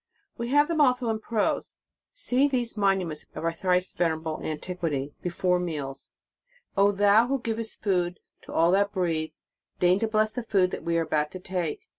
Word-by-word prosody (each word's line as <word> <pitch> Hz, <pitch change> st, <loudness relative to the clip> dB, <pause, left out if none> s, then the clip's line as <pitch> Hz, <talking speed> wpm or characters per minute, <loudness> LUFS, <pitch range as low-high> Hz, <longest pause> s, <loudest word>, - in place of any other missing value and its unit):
We 235 Hz, -, -4 dB
have 290 Hz, +3 st, +4 dB
them 330 Hz, -2 st, +1 dB
also 250 Hz, -4 st, +3 dB
in 220 Hz, -, -2 dB
prose. 220 Hz, -1 st, -1 dB, 0.4 s
See 280 Hz, -, +2 dB
these 245 Hz, -4 st, -1 dB
monuments 190 Hz, -7 st, 0 dB
of -, -, -5 dB
our 165 Hz, 0 st, 0 dB
thrice 180 Hz, +1 st, +1 dB
venerable 160 Hz, -2 st, -1 dB
antiquity. 155 Hz, -3 st, -3 dB
Before 180 Hz, 0 st, 0 dB
meals: 145 Hz, -6 st, -4 dB, 0.7 s
"O 200 Hz, +1 st, +5 dB
Thou 205 Hz, +3 st, +4 dB
who 275 Hz, +1 st, 0 dB
givest 225 Hz, -1 st, -4 dB
food 180 Hz, -3 st, 0 dB, 0.2 s
to -, -, -12 dB
all 165 Hz, +1 st, +3 dB
that 200 Hz, +1 st, +3 dB
breathe, 165 Hz, -4 st, -1 dB, 0.5 s
deign 180 Hz, +2 st, +4 dB
to 225 Hz, -, 0 dB
bless 215 Hz, 0 st, +1 dB
the 250 Hz, -, -3 dB
food 195 Hz, -5 st, +1 dB
we 170 Hz, 0 st, 0 dB
are 165 Hz, -, +2 dB
about 150 Hz, -1 st, 0 dB
to 185 Hz, -, -6 dB
take. 180 Hz, -4 st, -4 dB
185 Hz, 175 wpm, -27 LUFS, 165-225 Hz, 0.7 s, O